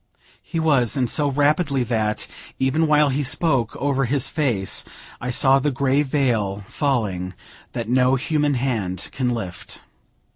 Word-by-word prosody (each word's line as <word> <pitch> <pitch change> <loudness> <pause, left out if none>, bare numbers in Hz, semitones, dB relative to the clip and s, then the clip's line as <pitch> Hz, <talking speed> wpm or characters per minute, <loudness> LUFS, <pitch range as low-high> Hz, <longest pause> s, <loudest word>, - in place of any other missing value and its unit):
He 165 - -4
was; 140 -7 +2
and 125 -2 +1
so 145 +5 +1
rapidly 145 0 +2
that, 110 -3 -1 0.3
even 145 +5 +1
while 150 -1 +4
he 140 +2 0
spoke, 135 -4 +1
over 135 -1 0
his 135 +1 0
face 120 -11 0 0.4
I 125 - -3
saw 135 +2 +4
the 145 - +1
grey 140 +1 +1
veil 120 -9 0
falling 100 - -1 0.4
that 115 -2 -3
no 125 +2 +3
human 145 +2 0
hand 110 -8 -2
can 130 -2 -1
lift. 110 -7 -5
130 Hz, 145 wpm, -22 LUFS, 115-145 Hz, 0.4 s, while